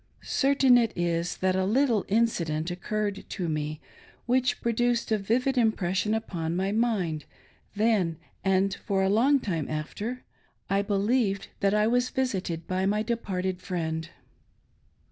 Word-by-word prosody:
Certain 270 Hz, -3 st, +4 dB
it 230 Hz, -2 st, +1 dB
is' 170 Hz, 0 st, -1 dB
that 185 Hz, 0 st, +1 dB
a 190 Hz, -, +1 dB
little 230 Hz, +1 st, +2 dB
incident 175 Hz, -7 st, 0 dB
occurred 205 Hz, +3 st, -3 dB
to 180 Hz, -4 st, -3 dB
me, 155 Hz, -1 st, -2 dB, 0.5 s
which 255 Hz, +1 st, +1 dB
produced 235 Hz, 0 st, 0 dB
a 220 Hz, -, +4 dB
vivid 250 Hz, +6 st, 0 dB
impres 215 Hz, -6 st, +1 dB
sion 215 Hz, +3 st, +1 dB
upon 170 Hz, -7 st, -3 dB
my 190 Hz, +2 st, 0 dB
mind, 200 Hz, -9 st, 0 dB, 0.5 s
then 205 Hz, -6 st, +2 dB, 0.3 s
and 190 Hz, 0 st, +2 dB
for 195 Hz, -1 st, -1 dB
a 190 Hz, -, +2 dB
long 260 Hz, +8 st, +4 dB
time 170 Hz, -, -3 dB
after. 205 Hz, +11 st, -4 dB, 0.5 s
I 195 Hz, 0 st, +3 dB
believed 200 Hz, 0 st, 0 dB
that 200 Hz, +1 st, +2 dB
I 210 Hz, 0 st, +3 dB
was 245 Hz, +2 st, +2 dB
visited 190 Hz, -10 st, -2 dB
by 185 Hz, +1 st, 0 dB
my 210 Hz, +2 st, +1 dB
departed 190 Hz, -5 st, -2 dB
friend. 160 Hz, -3 st, -3 dB
200 Hz, 145 wpm, -27 LUFS, 180-230 Hz, 0.5 s, Certain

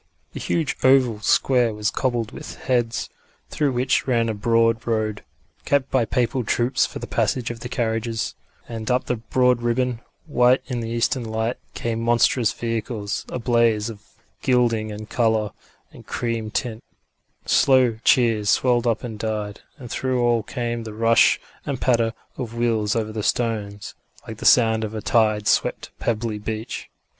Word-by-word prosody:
The -, -, -6 dB
huge 160 Hz, -5 st, -1 dB
oval 130 Hz, -5 st, +4 dB
square 120 Hz, 0 st, +2 dB
was 105 Hz, 0 st, 0 dB
cobbled 120 Hz, -4 st, -1 dB
with -, -, -8 dB
heads, 120 Hz, -3 st, -1 dB, 0.4 s
through 145 Hz, -3 st, 0 dB
which 125 Hz, +2 st, +1 dB
ran 115 Hz, -3 st, +2 dB
a -, -, 0 dB
broad 115 Hz, +2 st, +1 dB
road, 110 Hz, -2 st, -1 dB, 0.4 s
kept 140 Hz, -2 st, +1 dB
by 130 Hz, -3 st, +2 dB
papal 125 Hz, +1 st, 0 dB
troops 120 Hz, +3 st, +1 dB
for -, -, -8 dB
the -, -, -6 dB
passage 120 Hz, -3 st, 0 dB
of 115 Hz, -, -8 dB
the 120 Hz, -, -7 dB
carriages; 115 Hz, -2 st, -2 dB, 0.3 s
and 115 Hz, -2 st, -5 dB
up 125 Hz, +1 st, +1 dB
the 125 Hz, -, -1 dB
broad 125 Hz, +2 st, +2 dB
ribbon, 120 Hz, 0 st, 0 dB, 0.2 s
white 125 Hz, -4 st, +3 dB
in 125 Hz, -3 st, -3 dB
the 115 Hz, -1 st, -4 dB
eastern 120 Hz, +2 st, 0 dB
light, 110 Hz, +1 st, -2 dB, 0.2 s
came 115 Hz, -1 st, -2 dB
monstrous 120 Hz, 0 st, +3 dB
vehicles, 115 Hz, -2 st, -3 dB
a -, -, -3 dB
blaze 115 Hz, -2 st, +2 dB
of 105 Hz, -2 st, -12 dB, 0.4 s
gilding 115 Hz, -4 st, +2 dB
and 105 Hz, +1 st, -8 dB
colour 110 Hz, -3 st, +1 dB, 0.4 s
and -, -, -15 dB
cream 115 Hz, -2 st, -2 dB
tint; 115 Hz, 0 st, -3 dB, 0.6 s
slow 130 Hz, -4 st, +4 dB
cheers 115 Hz, -5 st, +3 dB
swelled 120 Hz, -1 st, +3 dB
up 115 Hz, -2 st, 0 dB
and 110 Hz, -4 st, -6 dB
died, 105 Hz, -2 st, -3 dB, 0.2 s
and 125 Hz, -5 st, -10 dB
through 130 Hz, -1 st, -1 dB
all 120 Hz, -1 st, +3 dB
came 120 Hz, +2 st, -3 dB
the 110 Hz, -1 st, -8 dB
rush 115 Hz, +1 st, +4 dB, 0.2 s
and 140 Hz, -3 st, -3 dB
patter 115 Hz, -3 st, +2 dB, 0.3 s
of 120 Hz, -3 st, -5 dB
wheels 115 Hz, -3 st, +1 dB
over 110 Hz, -1 st, -1 dB
the 110 Hz, 0 st, -4 dB
stones, 105 Hz, -3 st, -2 dB, 0.3 s
like -, -, -7 dB
the -, -, 0 dB
sound 110 Hz, -2 st, +5 dB
of 110 Hz, 0 st, -4 dB
a 110 Hz, -, -3 dB
tide 110 Hz, -2 st, +2 dB
swept -, -, +1 dB
pebbly 110 Hz, -2 st, -2 dB
beach. 110 Hz, +1 st, -5 dB
115 Hz, 165 wpm, -23 LUFS, 110-125 Hz, 0.6 s, sound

